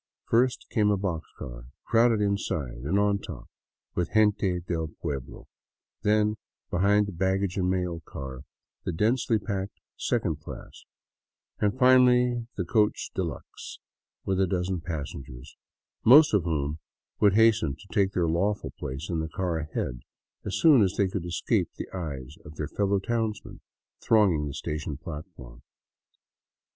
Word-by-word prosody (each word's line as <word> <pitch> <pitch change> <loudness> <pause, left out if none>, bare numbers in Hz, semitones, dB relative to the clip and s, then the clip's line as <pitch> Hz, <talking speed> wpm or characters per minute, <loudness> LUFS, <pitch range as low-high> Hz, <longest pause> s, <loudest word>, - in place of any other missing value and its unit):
First 125 +2 +2
came 105 -3 +3
a 100 - +3
box 85 -6 -3
car, - - -8 0.2
crowded 115 -1 +4
inside 85 -11 -1
and 90 +7 +1
on 100 0 +2
top 75 -11 -9 0.5
with 90 -1 -1
gente 105 -4 +3
del 85 -2 -2
pueblo; 70 -6 -5 0.6
then, 105 0 +2 0.3
behind 100 +3 +3
the 100 - -5
baggage 95 +1 0
and 90 -2 +1
mail 90 -2 -1
car, 65 -1 -7 0.4
the - - -2
densely 110 +6 +2
packed 100 -2 -4 0.2
second 95 - -1
class; 75 - -10 0.7
and 105 +3 +1
finally 125 -2 +5
the 90 - -1
coach 105 +3 +1
de - - -1
luxe - - -7 0.5
with 95 0 +1
a 95 - +3
dozen 90 0 -1
passengers, 70 -5 -7 0.5
most 145 +4 +8
of 100 -5 +3
whom 75 -2 -1 0.4
would 100 -2 +4
hasten 110 -10 +4
to 100 - -16
take 100 -1 +2
their 90 - +1
lawful 100 +6 0
place 65 +2 -5
in 85 -2 -2
the 80 0 -3
car 90 -2 -2
ahead 75 -5 -3 0.4
as 100 - -3
soon 150 -7 +6
as 95 -3 +2
they 100 - +3
could 90 -2 -4
escape 85 - 0
the - - -6
eyes 75 -9 -6
of 75 - -11
their 75 0 -3
fellow 100 +3 +1
townsmen 110 +1 -3 0.4
thronging 95 -9 +3
the 70 - -6
station 75 -1 -4
platform. 75 -7 -9
95 Hz, 150 wpm, -27 LUFS, 80-105 Hz, 0.7 s, most